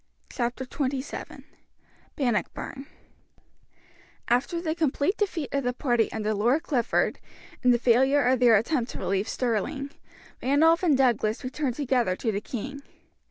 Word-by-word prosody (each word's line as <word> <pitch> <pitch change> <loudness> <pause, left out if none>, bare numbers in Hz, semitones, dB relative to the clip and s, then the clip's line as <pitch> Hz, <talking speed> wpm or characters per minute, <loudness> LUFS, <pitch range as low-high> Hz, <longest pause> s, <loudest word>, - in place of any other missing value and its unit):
Chapter 245 +1 -2
XXVII 265 +1 -4 0.7
Bannockburn 265 +2 -2 1.4
After 250 +8 +1
the 320 -2 -1
complete 320 +3 0
defeat 355 -8 -2
of 275 0 0
the 245 0 0
party 240 -3 +1
under 215 -1 -1
Lord 240 +10 +2
Clifford, 265 -9 0 0.4
and 250 -3 +4
the 240 - +4
failure 260 +4 +3
of 255 0 +3
their 240 -3 +6
attempt 240 +3 0
to - - -6
relieve 195 +2 -1
Stirling, 255 +4 -2 0.5
Randolph 315 +5 +4
and 320 -7 +3
Douglas 235 -3 +1
returned 260 -1 -2
together 250 -9 +1
to 225 +3 -1
the 200 0 -3
king. 265 +5 -6
255 Hz, 135 wpm, -26 LUFS, 235-285 Hz, 1.4 s, their